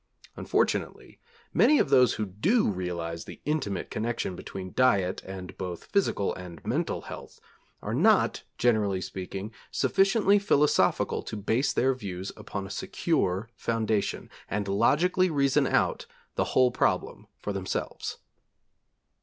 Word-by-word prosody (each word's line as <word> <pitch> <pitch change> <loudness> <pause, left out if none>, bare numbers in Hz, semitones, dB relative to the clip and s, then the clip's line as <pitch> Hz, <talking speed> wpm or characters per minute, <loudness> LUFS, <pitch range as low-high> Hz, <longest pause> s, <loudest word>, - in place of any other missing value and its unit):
Unfortunately - - -1 0.3
many 300 - +5
of 135 - +1
those 125 -4 +5
who 105 - -2
do 160 - +2
realise 85 -4 -3
the - - -10
intimate 145 -10 -2
connection 115 -4 -2
between 95 +1 -7
diet 100 -8 +2
and 95 -1 -7
both 90 -2 -5
physical 195 - +1
and 90 -3 -9
mental - - -1
health, - - -10 0.4
are - - -3
not, - - +3 0.2
generally 105 -5 +2
speaking, 95 +3 -6 0.2
sufficiently 200 +1 +3
philosophical 150 -7 +2
to 110 - -6
base 110 +7 +1
their 135 +2 +2
views 95 -6 -6
upon 100 -1 -6
a 95 - -8
secure 95 +1 -1
foundation 110 -2 -1 0.2
and 100 0 -2
logically 165 - +3
reason 140 -4 +2
out - - +1 0.3
the - - 0
whole 130 -1 +5
problem - - -1
for 105 - -4
themselves. 95 -1 -4
105 Hz, 130 wpm, -28 LUFS, 95-135 Hz, 0.4 s, many